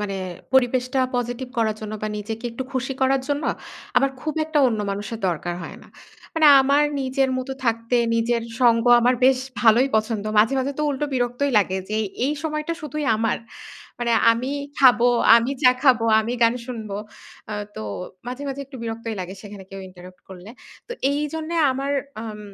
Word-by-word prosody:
মানে 200 -2 -3 0.4
পরিবেশটা 255 0 +2 0.2
পজিটিভ 245 +1 -3
করার 220 -2 +1
জন্য 215 0 -6
বা 215 - -1
নিজেকে 220 +3 -6
একটু 230 +3 -5
খুশি 260 +1 -2
করার 265 0 +3
জন্য 285 +1 -1 0.5
আমার 275 - +4
খুব 310 -1 -3
একটা 310 -1 0
অন্য 220 -3 -2
মানুষের 205 +3 -5
দরকার 175 +1 -3
হয় - - -8
না। - - -17 0.5
মানে 320 -1 +4
আমার 280 +2 +3 0.2
নিজের 265 0 0
মতো 255 +1 -4
থাকতে 230 +1 0 0.2
নিজের 230 0 +1 0.2
সঙ্গ 230 -2 +4 0.2
আমার 245 +2 +3
বেশ 260 0 +5 0.2
ভালই 235 +3 +5
পছন্দ। 215 -1 -1
মাঝে, 220 +5 +4
মাঝে 265 +2 -1
তো - - 0
উল্টো 290 +1 -2
বিরক্তই 245 +3 0
লাগে 190 -2 0
যে 215 - -1 0.3
এই 290 - 0
সময়টা 305 +1 -2
শুধুই 300 -1 -4
আমার। 225 +1 0 0.6
মানে 240 -1 0 0.2
আমি 250 +4 -2 0.3
খাবো, 245 -3 +6 0.3
আমি 235 +3 +2
চা 250 - +8
খাবো, 250 -5 +4
আমি 225 +2 -2
গান 230 0 +4
শুনব। 230 -4 -6 0.6
আ - - -3 0.2
তো - - -6 0.5
মাঝে, 250 +3 -5
মাঝে 275 0 -4
একটু 270 0 -11
বিরক্তই 225 0 -4
লাগে 185 0 -5
সেখানে 205 -2 -10
কেউ 195 - -8
ইন্টারাপ্ট 185 0 -14
করলে। 190 +1 -11 0.4
তো - - -8 0.2
এই 285 +1 -1
জন্যে 320 +1 -4 0.2
আমার 275 +2 -3 0.3
আম 215 -2 -7
245 Hz, 175 wpm, -22 LUFS, 220-270 Hz, 0.6 s, চা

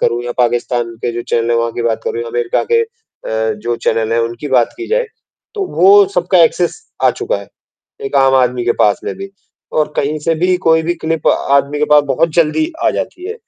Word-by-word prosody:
करूँ 120 +1 0
या 120 - -3
पाकिस्तान 120 -1 0
के 120 - -1
जो 120 - -4
चैनल 115 0 0
हैं 120 - +2
वहाँ 115 0 0
की 120 - -4
बात 115 -1 -1
करूँ, 115 - -2
अमेरिका 120 0 -1
के 460 - +5
अ, 275 - -5
जो 115 +3 -3
चैनल 115 0 -1
हैं 115 - +1
उनकी 115 +5 -4
बात 125 -3 +2
की 360 0 -6
जाए, - - +1 0.5
तो 405 -2 -2
वो 200 +4 +7
सबका 180 +1 +2
एक्सेस 175 +2 0 0.3
आ - - +6
चुका - - -2
है, - - -10 0.6
एक - - -2
आम 135 0 +4
आदमी 125 -1 +1
के 120 - +2
पास 105 -1 +3
में - - -3
भी। 195 0 -8 0.4
और 155 -1 0
कहीं 150 +2 -1
से 165 +2 0
भी 180 +3 +1
कोई 160 0 +4
भी 170 +2 -1
क्लिप 160 -1 -3
आदमी 140 +1 +1
के 150 - +2
पास 150 0 +7
बहुत 165 +5 +2
जल्दी 170 - +1
आ - - +4
जाती 355 - -5
है, 445 - -4
140 Hz, 225 wpm, -15 LUFS, 120-175 Hz, 0.6 s, वो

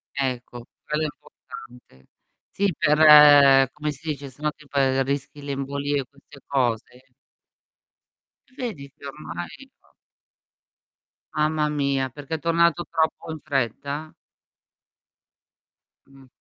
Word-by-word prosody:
Ecco, 125 -3 -4 0.2
quello 150 +1 -1
è - - +1
importante. 120 - -15 0.4
Sì, 200 -3 0
per 145 -3 +7
come 150 0 -4
si 150 +3 -9
dice, 140 -2 -5
se 130 +3 -20
no 150 0 0
tip 150 -2 -21
ehm, 135 -1 +2
rischi 140 +1 -4
le 140 - -5
embolie, 140 +1 -2
queste 140 0 -18
cose. 125 -1 -2 1.5
Vedi, 210 - -6
che - - -14
ormai 145 +2 -7 0.3
p - - -31 1.5
Mamma 155 0 +1
mia, 140 -2 -1
perché 145 +4 -6
è - - -5
tornato 170 +2 +2
troppo 160 0 -1
in 160 - -6
fretta? 140 +2 -3 1.9
Mh. 135 -1 -19
140 Hz, 115 wpm, -24 LUFS, 135-150 Hz, 1.9 s, per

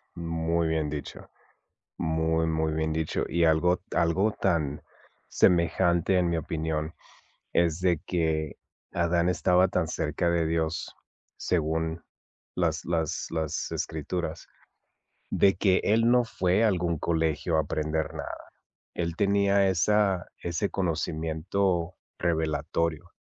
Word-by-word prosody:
muy 85 0 -1
bien 80 -2 0
dicho, 75 -1 -7 0.7
muy, 80 0 0
muy 80 -1 0
bien 80 0 -1
dicho. 80 -1 -1
Y 85 -1 +2
algo 90 +3 +3 0.2
algo 90 +5 +2
tan 80 -8 -1 0.5
semejante, 85 +1 +3
en 90 -1 +2
mi 85 - 0
opinión, 80 0 -3 0.6
es 85 -1 +2
de 90 -3 +2
que 80 -3 -1 0.4
Adán 85 0 +1
estaba 90 +1 +3
tan 90 -3 0
cerca 80 +2 -1
de 85 -2 +1
Dios, 80 0 -2 0.4
según 80 0 -1 0.5
las - - 0
las 80 -2 -1
las 80 -1 -2
escrituras, 80 +1 -4 0.8
de 95 -2 +3
que 95 0 +3
él 115 +3 +3
no 125 -1 +5
fue 95 +1 +1
a - - +5
algún 85 -3 0
colegio 80 0 0
a - - +4
aprender 80 +1 -2
nada, - - -7 0.4
él 85 -1 -2
tenía 100 -1 +3
esa 95 0 +2 0.2
ese 85 +4 -1
conocimiento 85 +1 -1 0.2
revelatorio. 85 0 -1
85 Hz, 120 wpm, -27 LUFS, 80-90 Hz, 0.8 s, no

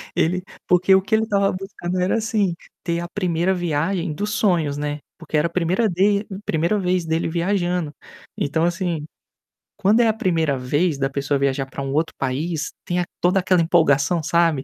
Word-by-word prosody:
ele 180 +3 +1 0.2
porque 180 +2 +4
o 190 - +4
que 220 +3 +1
ele 220 - +2
estava 200 -2 +1
buscando 185 -1 -4
era, 180 +4 +1
assim, 215 -4 0 0.3
ter 170 -1 -1
a 175 - -4
1º 180 -1 0
viagem 170 0 -1
dos 205 +6 -3
sonhos, 170 -9 +1
né. 145 0 -3 0.2
Porque 165 -2 -6
era 150 +3 +2
a - - -8
1º 180 +6 +1
de 200 +3 +2 0.2
primeira 170 +6 +1
vez 180 -2 0
dele 160 +1 0
viajando. 175 -1 0 0.5
Então, 155 +3 0
assim, 170 -3 -1 0.7
quando 205 +3 +3
é 235 - +5
a 220 - +3
1º 165 - 0
vez 145 +5 0
da 135 0 0
pessoa 140 +1 -1
viajar 135 0 0
para 135 - -7
um 135 0 -3
outro 160 +2 0
país 150 +4 -2
tem 180 -1 -1
a 175 - 0 0.2
toda 180 +2 +3
aquela 185 -1 +3
empolgação, 160 -1 +3
sabe? 165 -3 +2
175 Hz, 185 wpm, -22 LUFS, 155-190 Hz, 0.7 s, é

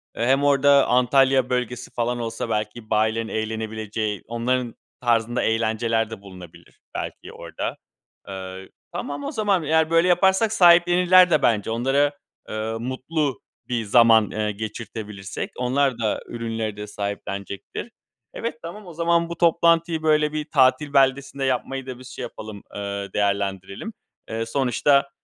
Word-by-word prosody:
Eee, 115 - -1
hem 135 +2 +3
orada 140 0 +5
Antalya 130 +1 +3
bölgesi 125 -1 -2
falan 120 +1 -1
olsa 115 0 -4
belki 110 +1 -3
bayilerin 110 +1 +1
eğlenebileceği, 110 -2 -3
onların 120 +1 -1 0.3
tarzında 120 0 +1
eğlenceler 115 0 0
de 110 -3 -8
bulunabilir 90 -4 -14 0.2
belki - - -6
orada. - - -5 0.5
Eee, 95 -1 -8 0.2
tamam 145 0 -5
o - - -3
zaman, 200 -5 +1
yani, 160 +1 +2
böyle 165 +2 +4
yaparsak 190 +4 +3
sahiplenirler 180 -1 +6
de 155 - +4
bence 110 -3 +1
onlara, 135 +5 +2 0.4
eee, 110 +1 -3
mutlu 130 +2 -2 0.3
bir 120 -2 -1
zaman, 115 0 +5
eee, 105 0 -1
geçirtebilirsek 105 -2 -6
onlar 125 0 +1
da 110 -2 0
ürünleri 115 -2 -4
de 105 0 -6
sahiplenecektir. 100 -1 -5 0.4
Evet, 230 0 -4
tamam 195 +5 -8
o 170 - -9
zaman 170 +1 +1
bu 170 - -6
toplantıyı 170 -1 +3
böyle 155 -1 +3
bir 155 +1 -4
tatil 140 0 +3
beldesinde 135 0 +2
yapmayı 130 +1 -2
da 125 -1 -7
biz 130 - -11
şey 130 - -7
yapalım, 110 -3 -8
eee, 100 -1 -4
değerlendirelim. 100 - -2 0.4
Eee, 115 +1 -2
sonuçta, 140 +3 +2
125 Hz, 140 wpm, -23 LUFS, 110-145 Hz, 0.5 s, sahiplenirler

